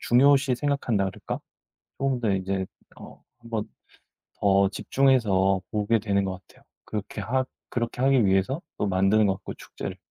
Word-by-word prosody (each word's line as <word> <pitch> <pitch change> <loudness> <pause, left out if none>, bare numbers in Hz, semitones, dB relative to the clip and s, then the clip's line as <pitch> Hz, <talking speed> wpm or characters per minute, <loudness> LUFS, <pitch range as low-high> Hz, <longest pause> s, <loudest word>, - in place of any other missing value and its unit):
중요시 135 +1 +4
생각한다 130 -8 0
그럴까 95 - -5 0.6
쪼금 135 -3 0
더 110 -3 +1
이제 95 0 -1 0.3
어 - - -12 0.2
1 115 -1 -14
번 110 -2 -3 0.7
더 100 -1 +4
집중해서 100 -8 +2
보게 105 +2 +2
되는 100 -1 0
것 95 - -2
같아요. - - -22 0.2
그렇게 105 0 -5
하 130 +6 0 0.3
그렇게 120 +1 -3
하기 135 -4 +4
위해서 95 - +1 0.2
또 - - 0
만드는 95 +3 +3
것 95 - +1
같고, - - -8
축제를. - - -7
110 Hz, 310 characters per minute, -26 LUFS, 95-130 Hz, 0.7 s, 중요시